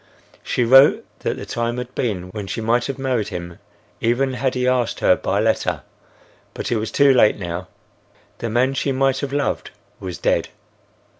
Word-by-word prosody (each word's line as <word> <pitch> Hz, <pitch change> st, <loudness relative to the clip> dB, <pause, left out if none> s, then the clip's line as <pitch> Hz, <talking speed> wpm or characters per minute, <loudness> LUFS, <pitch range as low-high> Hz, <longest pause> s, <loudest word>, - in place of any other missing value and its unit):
She 125 Hz, -, 0 dB
wrote 135 Hz, +4 st, +6 dB
that -, -, -2 dB
the -, -, -7 dB
time 120 Hz, +1 st, -2 dB
had 125 Hz, 0 st, -6 dB
been 95 Hz, -7 st, -2 dB
when 100 Hz, 0 st, -6 dB
she 115 Hz, -, -4 dB
might 115 Hz, +2 st, +1 dB
have 135 Hz, -, -4 dB
married 130 Hz, -6 st, -1 dB
him 85 Hz, -1 st, -7 dB, 0.4 s
even 125 Hz, +3 st, +1 dB
had 130 Hz, +1 st, -1 dB
he 125 Hz, 0 st, 0 dB
asked 125 Hz, -2 st, +1 dB
her 90 Hz, -, +4 dB
by 100 Hz, -, -1 dB
letter, 110 Hz, +1 st, 0 dB, 0.7 s
but -, -, -4 dB
it 120 Hz, -, +2 dB
was 110 Hz, +1 st, -2 dB
too 140 Hz, -1 st, +4 dB
late 115 Hz, -4 st, +4 dB
now. 90 Hz, -1 st, -5 dB, 0.7 s
The 115 Hz, -, -3 dB
man 125 Hz, +4 st, +2 dB
she 135 Hz, 0 st, -1 dB
might 135 Hz, 0 st, +1 dB
have 140 Hz, -2 st, -4 dB
loved 145 Hz, 0 st, -1 dB, 0.3 s
was 90 Hz, -2 st, -6 dB
dead. -, -, +1 dB
120 Hz, 180 wpm, -21 LUFS, 105-130 Hz, 0.7 s, wrote